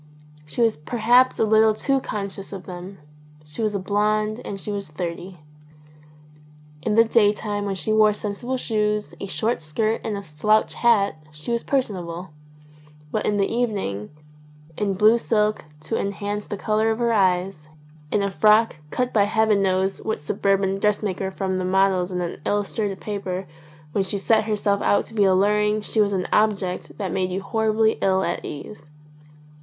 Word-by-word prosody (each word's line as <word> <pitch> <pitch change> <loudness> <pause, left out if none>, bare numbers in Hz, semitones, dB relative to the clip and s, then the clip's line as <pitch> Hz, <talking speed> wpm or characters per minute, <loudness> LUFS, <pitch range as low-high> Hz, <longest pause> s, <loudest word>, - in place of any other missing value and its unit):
She 235 +10 0
was 225 -6 +2
perhaps 240 +9 +3
a - - +2
little 220 0 +4
too 270 +4 +1
con 210 -4 -3
scious 195 0 -8
of 195 -2 -7
them. 185 +1 -8 0.5
She 150 +9 -7
was 215 -2 0
a - - +2
blonde 215 +3 0
and 195 - -5
she 210 - -5
was 200 -1 -4
thirty. 175 +3 -6 1.4
In 210 +5 0
the 225 - +7
daytime 210 -2 +1
when 195 -1 -2
she 190 +4 -1
wore 215 -1 +5
sensible 210 +5 -4
boots, 210 -2 0
a 200 - -4
short 220 +2 -1
skirt, 215 +9 -1
and 210 -2 -3
a 200 - -6
slouch 195 +7 +1
hat, 200 -9 +2
she 150 +8 -7
was 235 0 0
personable; 180 - -2 0.8
but - - -1
in 210 - +1
the 200 - +3
evening, 200 - -2 0.7
in 200 +1 -1
blue 215 +4 +5
silk 215 -5 0 0.2
to 155 - -2
enhance 205 +1 -3
the 205 - -4
colour 215 +2 +1
of 220 - 0
her 235 -1 +1
eyes, 185 -5 +1 0.4
in 205 - +1
a 200 - -1
frock 215 +3 +4
cut 250 +7 -1
by 205 -2 +4
heaven 215 -1 +2
knows 190 0 +1
what 220 - -2
suburban 195 +5 0
dressmaker 200 -2 0
from 190 -1 -2
the - - -2
models 190 0 +2
in 180 0 -2
an 170 -4 -5
illustrated 205 -1 -1
paper, 195 -3 -4 0.5
when 195 - +1
she 190 +2 -3
set 215 +2 +2
herself 205 -2 0
out 205 - +2
to - - -11
be 210 -3 +3
alluring 210 +3 +3
she 215 +1 0
was 205 -1 +2
an 185 -2 -1
object 200 -4 0
that 195 -4 -3
made 185 -1 0
you 190 +1 -3
horribly 220 +1 +1
ill 190 0 +2
at 175 - -2
ease. 150 +5 -8
205 Hz, 175 wpm, -23 LUFS, 190-215 Hz, 1.4 s, the